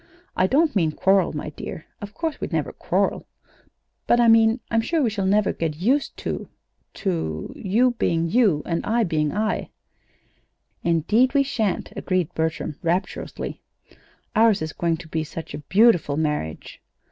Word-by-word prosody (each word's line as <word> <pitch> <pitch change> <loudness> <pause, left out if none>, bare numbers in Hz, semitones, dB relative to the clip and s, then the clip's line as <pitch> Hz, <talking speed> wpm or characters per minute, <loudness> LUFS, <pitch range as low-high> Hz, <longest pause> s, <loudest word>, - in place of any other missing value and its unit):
I 185 - +3
don't 300 - +2
mean 160 -5 +2
quarrel, 190 +2 +3 0.2
dear. 155 - -7 0.2
Of 205 0 -8
course 325 -2 -3
we'd - - -4
never - - -1
quarrel! - - -1 0.8
But 240 - +4
I 240 - +5
mean 225 +1 +5
I'm 225 -1 +3
sure 330 +8 0
we 230 - +1
shall 200 -3 -1
never 205 +1 +2
get 160 -2 -2
used 250 - 0
to - - -3 0.5
to 165 - -3
you 230 +6 +2
being 165 0 +1
you, 190 -6 +3
and 170 -1 -2
I 230 +2 +1
being 155 -5 0
I." 215 +4 -1 1.1
"Indeed 210 - +2
we 280 - +5
sha'n't," 220 -9 -2
agreed 180 -2 -1
Bertram, 160 -1 -2
rapturously. 175 +3 -3 0.7
"Ours 220 -6 +4
is 155 - -5
going 170 -1 0
to 170 - -11
be 160 0 -2
such 160 0 -8
a 145 - -5
beautiful 175 -2 +3
marriage!" 150 - -3
190 Hz, 155 wpm, -23 LUFS, 160-225 Hz, 1.1 s, I